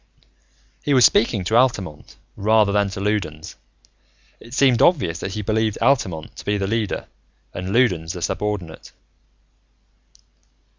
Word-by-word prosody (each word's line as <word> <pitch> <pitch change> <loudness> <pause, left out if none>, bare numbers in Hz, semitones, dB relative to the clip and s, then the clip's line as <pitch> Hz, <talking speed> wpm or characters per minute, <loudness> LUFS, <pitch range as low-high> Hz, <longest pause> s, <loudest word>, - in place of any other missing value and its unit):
He 145 - +1
was 125 - +7
speaking 110 -4 +2
to 110 +5 -1
Altamont, 105 - 0 0.2
rather 105 0 +3
than 100 0 +1
to 95 - -7
Loudons. 95 -7 -3 0.8
It 120 +2 -11
seemed 130 -4 +3
obvious 95 - +2
that 95 - -5
he 105 - -4
believed 110 +1 0
Altamont 100 - 0
to - - -9
be 105 0 -1
the 100 - -2
leader 110 0 -2 0.5
and 90 +1 -5
Loudons 90 -9 +1
the 90 -2 -6
subordinate. 100 -6 -4
105 Hz, 135 wpm, -21 LUFS, 90-115 Hz, 0.8 s, was